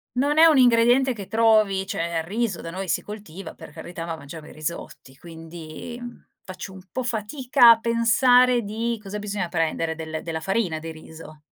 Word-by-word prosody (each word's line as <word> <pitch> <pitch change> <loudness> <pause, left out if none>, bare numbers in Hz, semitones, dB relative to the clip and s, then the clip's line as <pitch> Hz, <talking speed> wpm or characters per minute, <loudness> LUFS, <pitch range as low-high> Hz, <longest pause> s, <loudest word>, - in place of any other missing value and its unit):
non 285 +4 +1
è 320 - +8
un 315 -4 +6
ingrediente 245 +1 +4
che 200 -4 -8
trovi. 215 -4 +3
Cioè, 170 -3 -2
il 160 - -3
riso 205 +1 -2
da 165 - -7
noi 190 +2 -6
si - - 0
coltiva, 195 -4 -9
per - - -12
carità, 165 +3 -8
ma 165 -1 -4
mangiamo 150 +1 -11
i - - -12
risotti, 155 -4 -7
quindi, 165 - -10
mhmm, 240 0 -10 0.2
faccio 185 +1 -8
un 190 - -12
po' 255 - -2
fatica 245 +2 +3
a 230 -1 +6
pensare 240 +2 +4
di 225 +3 -3
cosa 210 0 -6
bisogna 205 -3 -3
prendere? 165 -1 -1
Del 160 -1 -6
della 160 -1 -4
farina, 185 -1 -1
di 160 +1 -7
riso. 160 0 -13
195 Hz, 190 wpm, -23 LUFS, 165-235 Hz, 0.2 s, è